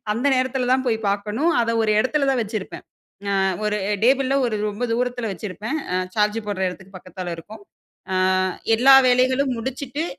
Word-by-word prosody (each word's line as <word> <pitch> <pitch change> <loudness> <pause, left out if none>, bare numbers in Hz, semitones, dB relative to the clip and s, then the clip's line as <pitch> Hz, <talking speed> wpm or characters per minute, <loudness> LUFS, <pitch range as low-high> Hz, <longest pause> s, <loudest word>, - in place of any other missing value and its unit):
அந்த 245 +5 -1
நேரத்துல 255 -1 -1
தான் 260 0 +1
போய் 225 -2 +1
பார்க்கணும். 210 +11 0
அத 230 - -1
ஒரு 215 - +1
எடத்துல 275 +3 0
தான் 255 - 0
வச்சிருப்பேன். 210 -2 -6 0.5
அ - - 0 0.3
ஒரு 210 0 0 0.3
டேபிள்ல 270 +1 +3
ஒரு 215 -2 -2
ரொம்ப 210 +4 -4
தூரத்துல 245 -2 -2
வச்சிருப்பேன். 210 - -5 0.2
அ - - +2 0.2
சார்ஜ் 210 +1 +2
போடுற 190 -2 -2
இடத்துக்கு 190 +1 -10
பக்கத்துல 180 -1 -7
இருக்கும். 205 +5 -11 0.5
"அ - - +1 0.6
எல்லா 265 +4 +7
வேலைகளும் 255 +1 +2
முடிச்சுட்டு, 265 +5 -4
235 Hz, 160 wpm, -22 LUFS, 205-260 Hz, 0.6 s, எல்லா